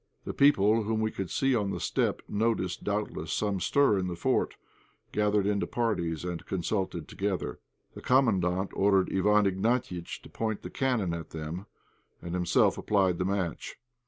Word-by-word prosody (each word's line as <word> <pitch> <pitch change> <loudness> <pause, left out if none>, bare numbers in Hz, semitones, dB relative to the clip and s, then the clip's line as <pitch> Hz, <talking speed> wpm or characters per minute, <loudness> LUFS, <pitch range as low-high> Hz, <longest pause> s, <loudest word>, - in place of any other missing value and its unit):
The - - -4
people 115 -6 +4
whom 110 +1 -1
we 110 0 0
could 95 -3 -4
see 135 +8 +1
on 105 -5 +1
the - - -3
steppe, - - 0
noticing 105 -4 -1
doubtless 105 -6 -2
some 100 0 0
stir 135 0 +3
in 90 - -2
the 90 - -3
fort, 85 - 0 0.6
gathered 105 -1 +2
into 100 0 0
parties, 85 -9 -1
and 85 -1 -4
consulted 95 -3 -2
together. 95 -1 -3 0.3
The - - -10
Commandant 95 -8 +2
ordered 95 -1 +3
Iwán 105 +2 +3
Ignatiitch 95 -2 -1
to - - -11
point 110 -2 -3
the - - -7
cannon 125 -10 0
at 85 -1 -6
them, 80 +5 -6 0.5
and 85 - -7
himself 90 -1 +2
applied 95 -4 +2
the 90 - 0
match. 95 -4 -2
100 Hz, 160 wpm, -29 LUFS, 90-110 Hz, 0.6 s, people